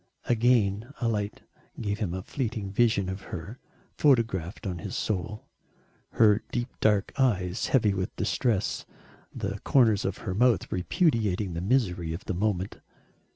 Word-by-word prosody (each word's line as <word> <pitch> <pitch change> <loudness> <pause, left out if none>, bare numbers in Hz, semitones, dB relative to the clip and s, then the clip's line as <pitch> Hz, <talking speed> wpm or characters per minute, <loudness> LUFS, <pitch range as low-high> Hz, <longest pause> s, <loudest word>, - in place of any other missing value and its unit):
Again 115 -1 +2
a 120 - 0
light 105 -2 -2 0.4
gave 105 0 -2
him 100 -6 -1
a 95 - -5
fleeting 110 -7 -3
vision 105 -2 +2
of 95 +1 -4
her 100 +8 -7 0.4
photographed 115 - +2
on 90 -3 -2
to 80 - -9
his - - -4
soul. 105 +2 -2 0.7
Her 105 -1 +5
deep 120 +1 -2
dark 105 -2 +2
eyes, 95 -8 +1
heavy 110 -6 +3
with 95 -1 -3
distress, 110 -5 0 0.4
the - - -4
corners 115 -7 +3
of 95 0 -2
her 95 - -1
mouth 115 -2 +2
repudiating 105 - +1
the 85 - -3
misery 90 -7 +1
of 85 - -7
the 95 - -2
moment. 95 0 -1
105 Hz, 150 wpm, -28 LUFS, 95-115 Hz, 0.7 s, Her